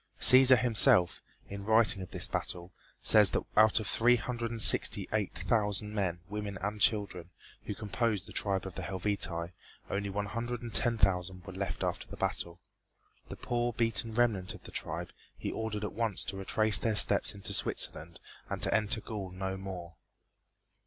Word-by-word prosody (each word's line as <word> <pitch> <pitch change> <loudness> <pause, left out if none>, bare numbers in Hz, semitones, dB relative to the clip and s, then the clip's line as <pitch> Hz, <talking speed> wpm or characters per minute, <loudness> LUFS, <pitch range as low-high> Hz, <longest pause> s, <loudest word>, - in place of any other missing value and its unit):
Cæsar 130 0 +7
himself, 110 -8 +6 0.3
in 100 0 -8
writing 110 -2 +4
of 90 - -8
this - - -1
battle, 90 +1 -4 0.3
says 105 -3 +6
that - - -2
out 110 +1 +5
of 110 - -5
three 120 +4 +3
hundred 120 +1 -4
and 115 0 -6
sixty - - +4
eight 105 -3 -1
thousand 105 +2 -1
men, 90 -5 -2
women 105 -1 -5
and 105 +1 -4
children, 100 -6 0 0.4
who 105 - -5
composed 105 -1 -2
the - - -12
tribe 95 -2 -1
of 95 - -7
the - - -6
Helvetii, 95 -3 -3 0.4
only 100 0 -2
one 100 +1 -3
hundred 120 +3 -5
and 115 -2 -7
ten 120 -1 +3
thousand 95 -2 0
were 95 - -9
left 95 +1 -4
after - - -3
the - - -10
battle. 85 0 -3 0.7
The - - -7
poor 120 0 -2
beaten 115 -1 -1
remnant 110 -6 0
of - - -15
the - - -12
tribe - - -5 0.3
he - - -4
ordered 110 -2 -4
at 105 - -4
once 110 -3 -1
to 95 - -5
retrace 100 +1 +1
their 110 -2 -1
steps 100 0 +3
into 100 - -1
Switzerland 85 +2 -1 0.3
and - - -4
to - - +3
enter 110 +1 0
Gaul 100 -4 -6
no 95 +1 -5
more. 95 -3 -8
105 Hz, 180 wpm, -30 LUFS, 95-110 Hz, 0.7 s, Cæsar